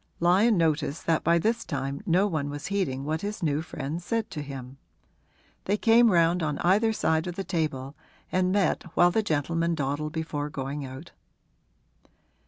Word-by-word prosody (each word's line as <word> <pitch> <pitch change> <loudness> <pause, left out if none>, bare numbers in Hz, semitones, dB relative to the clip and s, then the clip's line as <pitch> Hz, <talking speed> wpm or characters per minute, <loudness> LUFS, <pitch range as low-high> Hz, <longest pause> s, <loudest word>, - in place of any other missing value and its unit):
Lyon 190 +6 +4
noticed 160 -2 0
that 165 -1 +1
by 170 +1 +4
this 225 +7 0
time 140 -2 -4
no 180 +3 +4
one 155 -7 -2
was 145 +1 -6
heeding 140 -9 -1
what 155 +1 -2
his 205 -2 -4
new 150 -1 +1
friend 160 +1 -5
said 225 +4 -2
to 150 - -4
him. 135 -2 -8 0.9
They 205 +2 +1
came 230 +2 +5
round 170 -1 +3
on 150 -2 -1
either 205 +6 +4
side 160 -6 0
of 175 - -4
the 195 - -3
table 150 -6 -2 0.4
and 185 0 +2
met 200 0 +2
while 175 0 +5
the 220 - +2
gentlemen 165 -1 0
dawdled 150 +1 -2
before 150 -2 -3
going 140 +1 -4
out. 135 +5 -9
165 Hz, 170 wpm, -27 LUFS, 145-185 Hz, 0.9 s, came